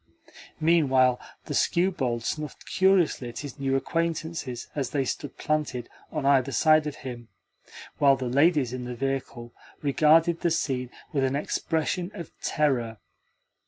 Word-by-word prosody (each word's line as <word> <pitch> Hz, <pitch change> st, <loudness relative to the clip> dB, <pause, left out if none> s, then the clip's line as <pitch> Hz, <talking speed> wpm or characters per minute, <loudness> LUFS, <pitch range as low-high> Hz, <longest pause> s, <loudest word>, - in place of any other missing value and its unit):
Meanwhile 135 Hz, -6 st, +3 dB, 0.3 s
the -, -, -5 dB
skewbald 135 Hz, -10 st, +1 dB
snuffed 150 Hz, +4 st, -4 dB
curiously 185 Hz, -9 st, +2 dB
at 120 Hz, -, -7 dB
his 140 Hz, -, -9 dB
new 135 Hz, -1 st, 0 dB
acquaintances 160 Hz, -4 st, -2 dB
as 140 Hz, -3 st, -2 dB
they 140 Hz, -2 st, 0 dB
stood 145 Hz, +2 st, -5 dB
planted 145 Hz, -5 st, -2 dB, 0.2 s
on 155 Hz, -3 st, -3 dB
either 135 Hz, -1 st, +3 dB
side 155 Hz, +4 st, +4 dB
of 145 Hz, -, -4 dB
him; 120 Hz, -2 st, -7 dB, 0.7 s
while 140 Hz, -1 st, +6 dB
the 130 Hz, -1 st, -5 dB
ladies 140 Hz, 0 st, +3 dB
in 125 Hz, -1 st, -5 dB
the 125 Hz, 0 st, -5 dB
vehicle 130 Hz, -3 st, -4 dB, 0.3 s
regarded 160 Hz, +4 st, +4 dB
the 175 Hz, -, +2 dB
scene 130 Hz, -6 st, -1 dB, 0.2 s
with 140 Hz, -2 st, +1 dB
an 135 Hz, +1 st, +1 dB
expression 165 Hz, +4 st, -1 dB
of 170 Hz, -5 st, -8 dB
terror. 125 Hz, -7 st, 0 dB
140 Hz, 140 wpm, -26 LUFS, 125-160 Hz, 0.7 s, while